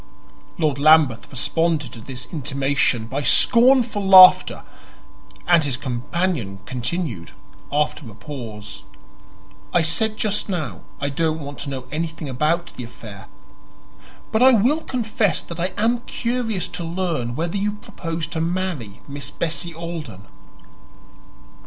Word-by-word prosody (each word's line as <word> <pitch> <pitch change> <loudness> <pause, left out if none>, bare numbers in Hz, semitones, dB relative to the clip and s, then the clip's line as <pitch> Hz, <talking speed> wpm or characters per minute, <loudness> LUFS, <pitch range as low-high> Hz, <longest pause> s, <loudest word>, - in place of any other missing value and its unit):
Lord 150 -5 0
Lambeth 150 -6 +4
responded 150 0 -1
to 115 - -10
this 125 +1 -7
intimation 140 -5 0
by 135 +5 -3
scornful 235 - +4
laughter, 190 -1 +8 0.8
and 170 -2 +4
his 135 -3 -1
companion 130 - -2
continued, 125 - -4 0.4
after 150 -2 -1
a 105 - -13
pause: 110 -6 -8 0.9
"I 175 - +3
said 215 +6 0
just 210 0 -1
now 150 - -3 0.2
I 140 - -1
didn't 160 +2 0
want 145 0 -8
to 145 - -5
know 130 -2 -5
anything 160 0 -4
about 155 +6 -1
the 125 - -6
affair; 110 -4 -11 1.0
but 220 - +1
I 260 +1 +8
will 250 +9 +3
confess 220 - 0
that 170 0 -9
I 175 - +1
am 235 +3 +2
curious 230 -5 -2
to 175 - -5
learn 165 -9 -2
whether 170 +6 -2
you 205 +1 -1
propose 165 -5 -5
to 160 - -3
marry 165 - -3
Miss 140 -1 -6
Bessie 165 +2 -4
Alden." 160 - -7
160 Hz, 130 wpm, -22 LUFS, 130-185 Hz, 1.0 s, laughter